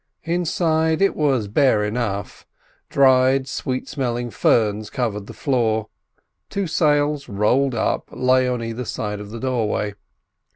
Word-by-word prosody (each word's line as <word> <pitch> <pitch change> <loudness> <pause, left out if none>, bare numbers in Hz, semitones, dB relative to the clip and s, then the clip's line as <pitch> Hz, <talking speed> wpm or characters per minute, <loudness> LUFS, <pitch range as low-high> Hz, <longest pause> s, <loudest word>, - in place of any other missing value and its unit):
Inside 160 -2 +1
it 195 - +2
was 135 -8 +1
bare 110 0 +3
enough. 105 -2 -3 0.4
Dried, 130 0 +4
sweet 130 -1 -3
smelling 120 -3 -3
ferns 105 0 +1
covered 110 -6 -3
the - - -8
floor. 110 -6 0 0.6
Two 200 -1 -2
sails, 145 -4 +1
rolled 120 +6 +1
up, 110 - -1
lay 130 0 +2
on 125 -2 -2
either 115 +2 -4
side 105 -2 -4
of 105 0 -8
the 115 +2 -7
doorway. 110 -5 -1
125 Hz, 130 wpm, -21 LUFS, 110-140 Hz, 0.6 s, Dried